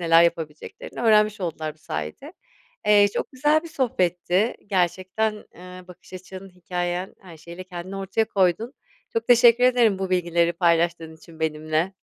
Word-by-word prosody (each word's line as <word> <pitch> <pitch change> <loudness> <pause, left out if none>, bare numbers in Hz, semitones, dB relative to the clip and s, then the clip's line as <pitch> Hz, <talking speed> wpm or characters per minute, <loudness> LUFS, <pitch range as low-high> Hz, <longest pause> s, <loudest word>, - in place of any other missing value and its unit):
neler 165 0 +5
yapabileceklerini 160 -3 -3
öğrenmiş 215 -2 +3
oldular 155 -3 -4
bu - - -30
sayede. 75 - -6 0.5
Eee, 205 -1 +6
çok - - -3
güzel 295 +4 +2
bir 335 - -9
sohbetti. 190 - 0
Gerçekten, 185 +3 0 0.2
eee, 180 +1 -12
bakış 180 +1 -16
açın, 185 +1 -10
hikâyen 180 0 -4
her 175 -4 -13
şeyiyle 170 +3 -10
kendini 185 +1 -8
ortaya 195 +3 -1
koydun. 200 +6 0 0.4
Çok 230 0 -3
teşekkür 240 0 +6
ederim 240 -6 +3
bu 190 -1 -3
bilgileri 170 -1 +1
paylaştığın 170 -2 0
için 160 0 -17
benimle. 155 +3 -1
180 Hz, 145 wpm, -23 LUFS, 170-210 Hz, 0.5 s, Eee